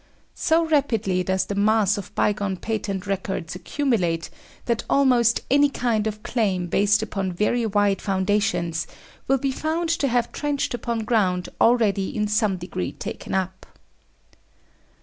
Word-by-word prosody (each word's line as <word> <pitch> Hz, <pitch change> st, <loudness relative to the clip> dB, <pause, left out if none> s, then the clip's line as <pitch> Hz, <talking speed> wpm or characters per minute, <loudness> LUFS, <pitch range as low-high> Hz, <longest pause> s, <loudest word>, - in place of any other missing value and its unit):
So 330 Hz, +1 st, +2 dB
rapidly 225 Hz, -, +1 dB
does 190 Hz, +1 st, 0 dB
the -, -, -4 dB
mass 210 Hz, 0 st, +3 dB
of 200 Hz, -, -8 dB
bygone 200 Hz, -2 st, 0 dB
patent 205 Hz, -2 st, -3 dB
records 190 Hz, -4 st, -3 dB
accumulate, 180 Hz, -, -1 dB, 0.3 s
that 235 Hz, -2 st, 0 dB
almost 245 Hz, -4 st, +3 dB
any 285 Hz, +1 st, +5 dB
kind 230 Hz, -5 st, 0 dB
of 215 Hz, 0 st, -5 dB
claim 195 Hz, -7 st, 0 dB
based 205 Hz, +4 st, +2 dB
upon 195 Hz, -3 st, -3 dB
very 225 Hz, +5 st, +1 dB
wide 205 Hz, -1 st, +1 dB
foundations 195 Hz, -4 st, 0 dB, 0.4 s
will 270 Hz, -, +3 dB
be 270 Hz, +1 st, -1 dB
found 320 Hz, +4 st, -2 dB
to 310 Hz, -4 st, +1 dB
have 240 Hz, -2 st, 0 dB
trenched 290 Hz, -3 st, -2 dB
upon 235 Hz, -1 st, -2 dB
ground 190 Hz, -6 st, +1 dB
already 215 Hz, -5 st, +3 dB
in 210 Hz, 0 st, +1 dB
some 210 Hz, -2 st, +1 dB
degree 170 Hz, -, -4 dB
taken -, -, -6 dB
up. 190 Hz, 0 st, -3 dB
210 Hz, 140 wpm, -23 LUFS, 190-240 Hz, 0.4 s, any